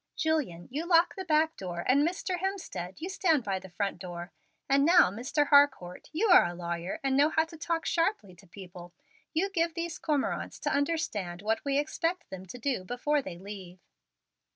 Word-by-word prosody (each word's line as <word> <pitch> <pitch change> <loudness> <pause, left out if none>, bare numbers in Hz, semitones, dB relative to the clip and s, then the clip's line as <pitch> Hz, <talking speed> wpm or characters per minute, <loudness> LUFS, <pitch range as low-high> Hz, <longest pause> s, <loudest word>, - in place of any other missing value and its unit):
Julian, 295 - -1
you 310 +6 -3
lock 340 0 +4
the 380 - -5
back 320 -1 +2
door, 175 -2 -5
and, 270 +3 +5
Mr. 355 +3 -1
Hemstead, 365 - -4
you 345 - -3
stand 340 - +1
by 195 -2 -2
the 190 0 -12
front 195 +2 -3
door; 175 -1 -7 0.4
and 275 0 +4
now, 345 - +6
Mr. 265 +7 -1
Harcourt, 285 - +3
you 370 +8 +1
are 360 - +8
a 175 - -6
lawyer, 170 +1 -4
and 270 -1 +1
know 290 +3 +5
how 320 0 +2
to 325 - -13
talk 330 +1 -2
sharply 330 - 0
to 190 - -18
people: 175 -1 -11 0.4
you 385 +5 0
give 335 -3 0
these 335 -1 -4
cormorants 295 -3 -1
to - - 0
understand 215 - -1
what 220 +1 0
we 280 -1 0
expect 330 +4 -2
them 190 0 -8
to 250 - -8
do 250 -5 -2
before 265 +8 0
they 185 -9 -8
leave." 190 -1 -9
280 Hz, 190 wpm, -29 LUFS, -, 0.4 s, are